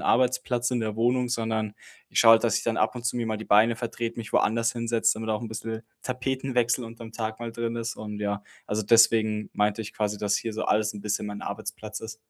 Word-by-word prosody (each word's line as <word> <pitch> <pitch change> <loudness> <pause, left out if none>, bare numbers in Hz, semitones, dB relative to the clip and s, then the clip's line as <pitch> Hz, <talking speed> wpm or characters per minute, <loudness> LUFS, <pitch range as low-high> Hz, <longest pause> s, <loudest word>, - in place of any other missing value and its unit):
Arbeitsplatz 125 0 +2
in 125 - +1
der 110 -2 -2
Wohnung, 125 +2 +2
sondern 110 -3 -1 0.3
ich - - +2
schaue 115 - +8
halt, 115 - +5
dass 115 - +3
ich - - -1
dann 115 -1 0
ab - - +1
und 125 -1 -7
zu 125 - 0
mir 115 -2 -1
mal 110 -1 -1
die 110 - -7
Beine 110 +3 +5
vertrete, 115 0 -4
mich 110 -3 -7
woanders 115 +1 +3
hinsetze, 115 -2 +1
damit 110 0 -5
auch 105 +1 -1
'n 115 - -4
bissel 110 0 -5 0.2
Tapetenwechsel 125 -1 0
unterm 115 0 -9
Tag 110 0 -4
mal 115 - -4
drin 115 0 -3
ist. 115 0 -3
Und 105 -1 -6
ja, 100 0 -2 0.2
also 105 +1 -1
deswegen 110 -1 +4
meinte 105 +1 +1
ich 105 - -8
quasi, 105 -1 -1
dass 105 -1 +1
hier 115 - -3
so 110 - -3
alles 105 0 +1
'n 105 - -7
bisschen 105 0 -1
mein 105 0 -6
Arbeitsplatz 105 +1 -5
ist. 110 0 -7
115 Hz, 235 wpm, -27 LUFS, 105-120 Hz, 0.3 s, schaue